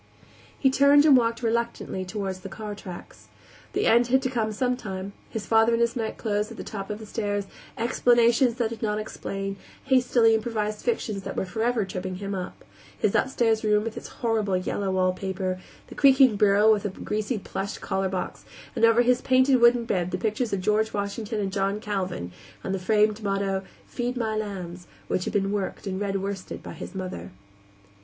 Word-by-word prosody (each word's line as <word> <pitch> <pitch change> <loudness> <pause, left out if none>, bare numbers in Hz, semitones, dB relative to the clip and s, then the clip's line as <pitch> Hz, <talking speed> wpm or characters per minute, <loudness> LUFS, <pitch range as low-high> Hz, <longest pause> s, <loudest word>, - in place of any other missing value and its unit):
He 265 - +3
turned 280 +2 +6
and 295 -3 +8
walked 230 -1 +1
reluctantly 235 -4 -1
toward 195 0 -3
the 185 +1 -9
car 210 +1 -6
tracks. 185 -3 -10 0.5
The - - 0
end 235 +1 +5
had 265 +2 +3
to 260 - -1
come 225 -4 0
sometime; 210 -5 -3 0.2
his 220 -2 -5
father 225 +1 +4
in - - -1
his 235 +1 +1
nightclothes 215 -2 -2
at - - -10
the - - -6
top 195 -2 -6
of 210 - -3
the 220 - -10
stairs, 205 -2 -2 0.3
explanations 235 +1 +3
that 235 -2 -1
did 230 - -7
not 210 -2 0
explain, 195 -2 -5 0.3
hastily 245 -3 +4
improvised 215 -1 -1
fictions 215 - -1
that - - -6
were - - -1
forever 225 +3 0
tripping 185 0 -5
him 200 +1 -5
up, 185 -2 -6 0.3
his - - +1
upstairs 230 -4 +2
room 210 0 +2
and 225 - -4
its - - -7
horrible 215 -5 0
yellow 190 +2 -2
wallpaper, 185 0 -1 0.3
the - - -12
creaking 265 -4 +6
bureau 205 +1 +5
with 210 - 0
the 205 - -2
greasy 215 +4 -3
plush 195 0 -5
collarbox, 190 -1 -3 0.3
and - - -2
over 230 +1 +5
his 250 +1 +3
painted 260 0 +4
wooden 235 0 +5
bed 180 -5 0
the 185 - -2
pictures 220 +4 -1
of 200 - -1
George 215 +3 +1
Washington 210 +2 -3
and 195 -2 -2
John 195 +1 0
Calvin, 185 - -3 0.3
and 190 - -2
the 195 - -1
framed 210 +2 +2
motto, 195 -1 -1 0.2
"Feed 245 +1 -3
my 220 -2 -1
Lambs," 185 -5 -5 0.2
which 185 - -1
had - - -3
been 195 -1 +1
worked 205 0 -3
in 190 -1 -3
red 195 -1 -1
worsted 195 -1 -5
by - - -7
his - - -9
mother. 180 - -5
210 Hz, 185 wpm, -26 LUFS, 195-235 Hz, 0.5 s, and